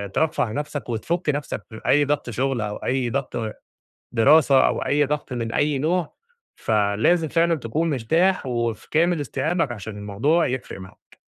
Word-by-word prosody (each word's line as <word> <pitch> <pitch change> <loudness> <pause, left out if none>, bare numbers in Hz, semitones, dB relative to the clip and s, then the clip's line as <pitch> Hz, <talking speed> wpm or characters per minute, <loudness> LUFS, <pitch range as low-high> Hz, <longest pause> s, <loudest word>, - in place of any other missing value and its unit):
ترفّه 155 -8 +1
نَفْسك 145 +1 -4
وتفُك 155 +9 -2
نَفْسك 145 0 -2
من 110 - -8
أي 145 +1 +4
ضَغْط 145 -3 -1
شُغل 125 +1 -1
أو 105 -1 -3
أي 130 -1 -1
ضَغْط 130 -1 -3 0.8
دراسة 140 +3 +5
أو - - 0
أي 145 +1 +3
ضَغْط 145 -1 -3
من 115 -2 -3
أي 145 -1 +1
نوع، 165 +3 -1 0.4
فلازم 110 +11 +1
فعلًا 170 +2 +2
تكون 155 +6 -1
مرتاح 160 +7 +1
وفي 120 -3 -2
كامل 170 +1 +2
استيعابك 155 +2 -1
عشان 105 -1 -7
الموضوع 115 +12 +1
يفرق 125 -6 -5
معاك. 95 0 -15
140 Hz, 155 wpm, -23 LUFS, 115-155 Hz, 0.8 s, دراسة